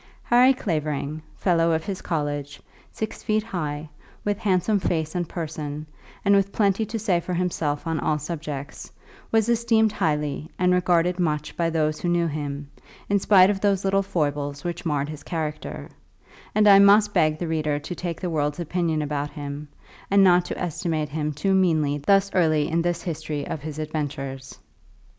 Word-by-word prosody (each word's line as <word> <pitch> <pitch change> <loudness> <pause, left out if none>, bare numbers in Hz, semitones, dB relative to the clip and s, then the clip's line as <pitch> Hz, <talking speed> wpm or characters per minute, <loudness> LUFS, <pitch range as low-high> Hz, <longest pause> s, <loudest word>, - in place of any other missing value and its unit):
Harry 245 +2 +5
Clavering, 155 - -2 0.2
fellow 165 -3 +2
of 160 0 0
his 195 -2 -4
college, 145 -3 -3 0.3
six 220 - -5
feet 215 -1 0
high, 155 -8 -4 0.4
with 205 0 0
handsome 200 +1 +2
face 160 -4 -1
and 175 -3 -2
person, 155 -3 -5 0.4
and 200 - +5
with 200 0 +2
plenty 200 0 +2
to 230 - -3
say 200 -5 +1
for 180 +1 -4
himself 165 -5 -1
on 165 -1 -1
all 155 - +1
subjects, 150 -2 -6 0.4
was 225 -1 +3
esteemed 230 -2 +3
highly 150 -3 -1
and 180 0 +3
regarded 180 0 +2
much 150 -3 -1
by 170 -1 +1
those 155 -2 0
who 175 - 0
knew 175 0 +2
him, 145 -2 -4 0.4
in 200 0 +3
spite 190 -1 +6
of 195 -2 -4
those 200 -2 +1
little 195 0 +3
foibles 145 -6 -2
which 175 0 -4
marred 145 -2 0
his 150 -1 -7
character; 155 -3 -4 0.7
and 210 0 +5
I 200 -1 +9
must 205 +1 +6
beg 155 0 +3
the 170 - -3
reader 155 -2 0
to 150 +5 -6
take 175 -1 -4
the 180 - -3
world's 150 0 -1
opinion 170 -2 -1
about 145 0 -2
him, 145 0 -7 0.4
and 200 0 +5
not 180 -1 +5
to - - -5
estimate 165 -3 -2
him 150 0 -2
too 190 +7 0
meanly 155 -6 +2
thus 195 +6 +3
early 155 -4 +3
in 165 +1 +1
this 175 0 -1
history 155 -3 -4
of 155 - -5
his 155 0 -6
adventures. 140 -3 -4
165 Hz, 175 wpm, -24 LUFS, 150-190 Hz, 0.7 s, I